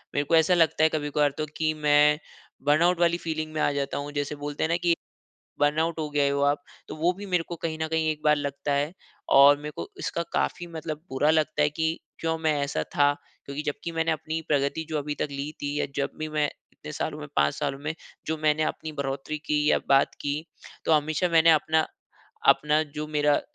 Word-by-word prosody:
मेरे 145 - +2
को 165 - +3
ऐसा 160 +3 +5
लगता 165 -2 +3
है 160 - +6
कभी-कभार 150 -2 +1
तो 155 - -1
की 155 -1 +1
मैं 150 0 +4 0.5
बर्नआउट 170 +4 +4
वाली 170 0 +3
फीलिंग 155 -2 -4
में 155 - -3
आ - - +3
जाता 140 -1 -2
हूँ। 145 +1 -4
जैसे 145 0 -2
बोलते 145 0 -4
है 160 - +1
ना 170 - +2
कि 170 -1 +4 0.7
बर्नआउट 160 +3 +2
हो 155 - -2
गए 145 -1 +2
हो 140 0 0
आप। 145 0 +2 0.3
तो - - -6
वो 170 +3 +2
भी 205 - -7
मेरे 180 -3 +1
को 170 - -5
कहीं 160 -1 -2
न 160 - +1
कहीं 160 0 0
एक 155 - -4
बार 150 0 +5
लगता 140 0 -2
है। 145 +3 0 0.4
और 140 +1 +8
मेरे 150 +1 -6
को - - -5
इसका 170 - -2
काफ़ी 175 - -1
मतलब 160 -2 -6
बुरा 145 +3 +2
लगता 155 -1 +2
है 150 - +3
कि 160 +2 -1 0.2
क्यों 165 0 0
मैं 160 -1 +1
ऐसा 140 - -1
था? 145 0 +5 0.3
क्योंकि 140 +2 -5
जब 145 - 0
कि 170 - -3
मैंने 165 0 +1
अपनी 160 +1 -3
प्रगति 145 +2 +1
जो 155 -2 -1
अभी 145 +1 -3
तक - - -1
ली 140 +1 -4
थी 145 +1 -2
या - - 0
जब 140 0 0
भी 155 - -3
मैं 150 -1 +1 0.3
इतने - - -10
सालों - - -3
में - - -7
5 75 0 +3
सालों 135 - -2
में 150 +2 -4 0.3
जो 160 0 -1
मैंने 155 0 +2
अपनी 155 0 -3
बढ़ोतरी 140 +1 -3
की 150 0 +1
या - - +4
बात 135 0 +4
की 145 0 -1 0.5
तो 160 - +2
हमेशा 155 +4 +2
मैंने 165 -1 +6
अपना, 155 0 +3 0.6
अपना 150 +1 +4
जो 150 0 -6
मेरा, 150 -1 +2
150 Hz, 225 wpm, -26 LUFS, 145-160 Hz, 0.7 s, और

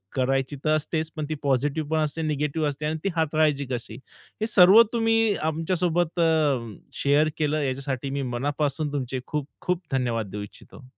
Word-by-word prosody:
करायची 135 +2 0
तर 155 0 +3
असतेच 155 +1 -2
पण 155 -1 -3
ती 155 - -1
पॉझिटिव्ह 145 +3 0
पण 160 - +1
असते 155 +2 -2
निगेटिव्ह 150 0 -1
असते 145 +2 -5
आणि 155 +1 -1
ती 195 - +1
हाताळायची 155 -3 +1
कशी. 115 -2 -4 0.5
हे - - +2
सर्व 195 +2 +8
तुम्ही 225 -2 +2
आमच्यासोबत 165 +2 -1
अ, 150 -9 +2 0.3
शेअर 145 +2 +3
केलं. 155 -1 0
याच्यासाठी 135 0 -3
मी 140 0 -2
मनापासून 140 +4 -2
तुमचे 130 -2 -2
खूप, 150 -2 -3
खूप 180 0 -1
धन्यवाद 120 -6 -1
देऊ 105 - -5
इच्छितो. 115 +6 -14
150 Hz, 165 wpm, -25 LUFS, 135-160 Hz, 0.5 s, सर्व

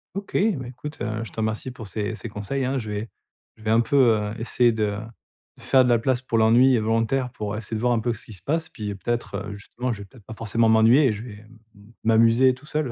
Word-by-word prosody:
OK! 200 0 -6
Ben 195 - +1
écoute, 130 +5 -8
heu, 110 -1 -2
je 110 - -9
te - - -17
remercie 110 +3 -2
pour 115 -4 -9
ces 105 +3 -3
ces 105 - -7
conseils, 105 +6 -3
hein. 135 +2 -1
Je 110 -4 -4
vais 105 +2 -4 0.5
je 110 - -18
vais 110 - 0
un 115 - +5
peu, 120 - -2 0.2
heu, 105 0 -3
essayer 120 +1 +2
de 105 -2 -1 0.6
de - - -17
faire 130 -1 +5
de - - +1
la 120 -1 +4
place 125 +2 0
pour 125 -3 -1
l'ennui, 120 +4 +5
heu, - - 0
volontaire, 115 +4 0
pour 105 -3 -4
essayer 110 0 -5
de - - -5
voir 125 0 +2
un 115 - +1
peu 120 +1 -1
ce 115 - -9
qui 110 - -10
se 90 - -9
passe. 160 - -2
Puis, 110 -9 -6
heu, - - -5
peut-être, 120 +4 -3
justement, 120 +5 -5
je 105 - -8
vais - - -8
peut-être 110 +2 -18
pas 110 - -8
forcément 115 +1 +1
m'ennuyer 115 +6 +5
et 115 - +1
je 105 +2 -7
vais 115 -4 -9
m 110 +2 -18 0.4
m'amuser 115 +3 +5
tout 130 +3 -14
seul, 150 -4 -2
115 Hz, 265 wpm, -24 LUFS, 110-130 Hz, 0.6 s, un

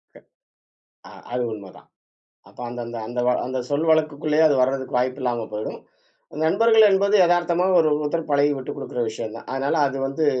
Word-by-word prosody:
க - - -13 0.9
அ, - - -14 0.2
அது 125 0 -1
உண்மதான். 100 -3 -12 0.6
அப்போ - - -13
அந்த 120 0 -7
அந்த 120 0 -7
அந்த 120 +1 -4
வ - - +5 0.2
அந்த 130 0 -3
சொல் 150 +3 0
வழக்குக்குள்ளேயே 155 0 +1
அது 145 - +2
வரதுக்கு 130 -1 -1
வாய்ப்பில்லாம 125 -2 -1
போய்டும். 105 +1 -5 0.7
நண்பர்கள் 225 +5 +5
என்பது 200 +2 +2
எதார்த்தமா 175 +1 +1
ஒரு 155 - +3
ஒருத்தர் 155 +1 -3
பழகி 145 +1 +3
விட்டுக் 130 - -7
கொடுக்கிற 125 - -4
விஷயம் 110 0 -6
தான். - - -13
அதனால 135 +4 -1
அது 135 0 -5
வந்து 150 +3 -1
140 Hz, 165 wpm, -22 LUFS, 125-160 Hz, 0.9 s, வ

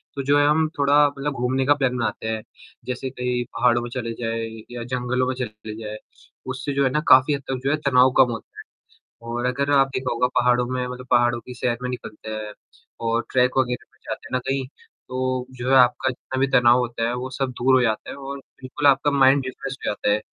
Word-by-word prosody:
तो 140 - -3
जो 145 +2 +3
है 145 - +4
हम 155 +1 +3
थोड़ा 145 +1 +5
मतलब 145 +1 -3
घूमने 130 +1 0
का 145 - +5
प्लान 135 -3 0
बनाते 115 -1 -2
हैं। 110 -1 -2 0.4
जैसे 125 +1 -4
कहीं 125 -1 -2
पहाड़ों 120 -1 +3
में 120 - -5
चले 115 -3 -3
जाए 115 0 -2 0.3
या 120 -1 -5
जंगलों 125 +1 -1
में 130 - 0
चले 110 -3 -6
जाए, 105 0 -6 0.5
उससे 130 +2 -4
जो 140 0 +2
है 130 - +3
ना 150 - +1
काफ़ी 130 +3 +7
हद 140 - -2
तक 130 -1 -2
जो 140 - +1
है, 155 - +2
तनाव 130 -1 +5
कम 125 - +6
होता। 115 - -8 0.7
और 120 +1 -2
अगर 140 +3 0
आप 135 -1 +5
देखा 130 0 -1
होगा 120 +1 +2
पहाड़ों 125 0 +3
में 125 0 -2
मतलब 125 0 -7
पहाड़ों 120 -1 +3
की 125 - -8
सैर 120 -1 -1
में 125 - -2
निकलते 110 -3 -8
हैं 110 -1 -5 0.6
और 115 +1 +1
ट्रेक 125 +1 +2
वग़ैरह 125 -2 0
पर - - -29
जाते - - -6
हैं - - -16
ना 130 - +2
कहीं 135 -1 -1 0.4
तो 130 0 -2
जो 125 +1 -4
है 135 - +6
आपका 125 +1 +4
जितना 130 +1 -6
भी 135 - +4
तनाव 120 -1 +5
होता 120 -2 -1
है 120 - -1
वो 125 +1 -4
सब 130 0 -2
दूर 130 +1 +5
हो 130 - +5
जाता 110 -2 -1
है - - -7
और 140 0 -7 0.2
बिल्कुल 145 +3 -2
आपका 140 +1 +4
माइंड 135 -1 +4
रिफ्रेश 135 +1 -5
हो - - -13
जाता 105 - -1
है। 105 - +1
125 Hz, 235 wpm, -23 LUFS, 120-135 Hz, 0.7 s, काफ़ी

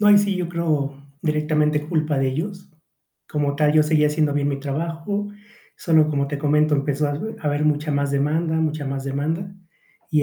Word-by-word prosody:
No, 210 - +3
ahí 205 0 +8
sí 200 -1 +1
yo 180 -2 -2
creo 155 -5 -1 0.3
directamente 150 -1 +1
culpa 155 -3 0
de 135 0 +2
ellos, 185 +9 -4 0.6
como 145 -1 -1
tal 150 0 +3
yo 155 0 +5
seguía 150 0 +3
haciendo 150 0 +1
bien 145 0 0
mi 140 -1 -2
trabajo, 165 +8 -3 0.5
solo, 160 -3 +3
como 140 -2 0
te 145 0 -3
comento, 150 +1 +3
empezó 145 +1 0
a - - -1
hab 215 +10 -5
a 150 - -5
haber 145 +1 +1
mucha 150 0 +1
más 140 -1 0
demanda, 155 +4 +1
mucha 155 -2 -1
más 135 0 -3
demanda, 160 +7 -2 0.6
y 155 -2 +3
150 Hz, 195 wpm, -22 LUFS, 145-160 Hz, 0.6 s, ahí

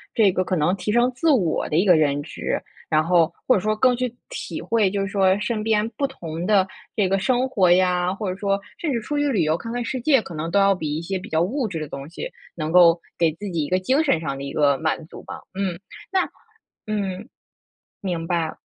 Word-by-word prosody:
这 210 -4 +5
个 185 0 0
可 185 - -1
能 170 +3 +2
提 195 +2 -3
升 240 +2 +3
自 320 +7 +1
我 190 - +2
的 - - -1
一 180 +6 +3
个 180 -3 +6
认 145 -2 +2
知， - - -3 0.3
然 155 0 +3
后 170 -1 +3
或 255 - +5
者 - - +2
说 215 +2 0
更 250 +3 +3
去 250 -1 -2 0.2
体 - - -5
会， 220 -4 +2
就 200 0 -2
是 195 - -1
说 195 -2 +3
身 225 0 -2
边 220 0 +2
不 275 - +1
同 170 -9 -6
的 200 -2 +4 0.3
这 195 -3 +2
个 195 - +2
生 250 +6 +1
活 190 -7 +3
呀， 180 0 +3
或 200 -2 -3
者 - - -4
说 200 -1 +1 0.2
甚 310 -4 -2
至 230 - -1
出 295 +7 -3
去 290 0 +1
旅 200 -10 +2
游 155 +2 +1
看 230 +4 -7
看 245 - -2
世 255 +2 -3
界， 270 -3 +4
可 180 - -10
能 160 +1 -3
都 200 - +1
要 195 0 +5
比 155 -5 -3
一 160 - -3
些 190 +3 -3
比 - - -10
较 160 +1 +1
物 240 +6 0
质 165 -5 -4
的 155 - -4
东 140 +1 -7
西 170 - -6 0.3
能 155 -1 -3
够 170 -1 +6 0.2
给 165 -2 +3
自 200 +5 -7
己 160 -3 -1
一 - - -6
个 185 +1 +2
精 260 +11 +2
神 220 - +2
上 140 -4 -3
的 140 - -6
一 140 - -5
个 140 -2 +3
满 160 0 -1
足 - - -11
吧。 - - -8
嗯， 190 -3 -2 0.3
那 380 -1 +2 0.6
嗯。 205 0 -3 0.7
明 175 -4 -3
白。 170 -3 -1
190 Hz, 265 characters per minute, -23 LUFS, 165-220 Hz, 0.7 s, 个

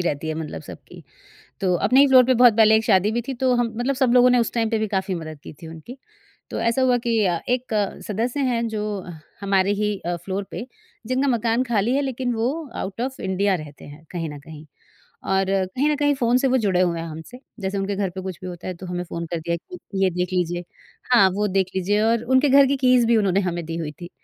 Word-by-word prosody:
रहती 160 -2 -2
है 155 - -2
मतलब 160 -1 -6
सबकी। - - -12 0.6
तो 185 -2 +1
अपने 250 +9 +3
ही 285 - +7
फ्लोर 255 -1 +7
पे 255 +1 +3
बहुत 240 -2 +6
पहले 220 -1 +6
एक 220 - 0
शादी 205 -1 +3
भी 240 +1 -1
थी 270 - -2
तो 255 -1 +3
हम 240 -2 0
मतलब 260 +3 0
सब 255 -2 +2
लोगों 250 0 +6
ने 250 - +4
उस 235 - 0
टाइम 225 -2 0
पे 225 - +1
भी 215 0 -1
काफ़ी 190 -1 -1
मदद 155 -3 -7
की - - -9
थी 160 - -8
उनकी, 165 +11 -10 0.5
तो - - -3
ऐसा 230 +3 +1
हुआ 250 -1 +3
कि 235 -1 0
अ, 170 -2 0
एक 245 -2 -1 0.3
सदस्य 235 +7 -2
हैं 235 0 0
जो 215 -1 -3 0.6
हमारे 195 0 +2
ही 210 0 -1
अ, 175 0 -1
फ्लोर 195 +3 -4
पे 235 - -6 0.4
जिनका 260 +3 0
मकान 235 0 +1
खाली 235 0 0
है - - +2
लेकिन 255 -2 -2
वो 230 +2 0 0.3
आउट 190 +3 -5
ऑफ 260 +2 -4
इंडिया 190 +1 0
रहते 155 -5 -8
हैं 145 +2 -13
कहीं 165 -3 -4
न 145 - -8
कहीं, 155 0 -12 0.6
और 195 0 +1 0.3
कहीं 285 +4 +2
न - - +1
कहीं 290 0 +2
फ़ोन 245 -2 +2
से 270 +1 +1
वो 260 0 +3
जुड़े 195 -6 +1
हुए 170 -2 0
हैं 165 - -5
हमसे, 160 +10 -10 0.2
जैसे 195 0 -3
उनके 195 +1 -2
घर 195 -1 -1
पे 190 +2 -7
कुछ 185 -2 -6
भी 185 - -6
होता 175 -1 -8
है, 185 - -3
तो 185 - -10
हमें 180 0 -4
फ़ोन 170 -1 -6
कर 170 0 -3
दिया 170 +1 -2
कि 195 - -6
ये 190 - +4
देख 180 +1 -3
लीजिए। 175 -1 -1 0.5
हाँ, 200 -6 +6
वो 210 +1 0
देख 190 -1 +1
लीजिए 200 +3 +1
और 230 +1 +2
उनके 260 +3 +3
घर 275 +1 +7
की 275 +1 0
कीज़ 255 -2 +4
भी 230 0 +4
उन्होंने 200 -3 +2
हमें 175 -2 -3
दी 165 +1 -5
हुई 160 -3 -4
थी, 175 - -7
205 Hz, 250 wpm, -22 LUFS, 180-245 Hz, 0.6 s, ही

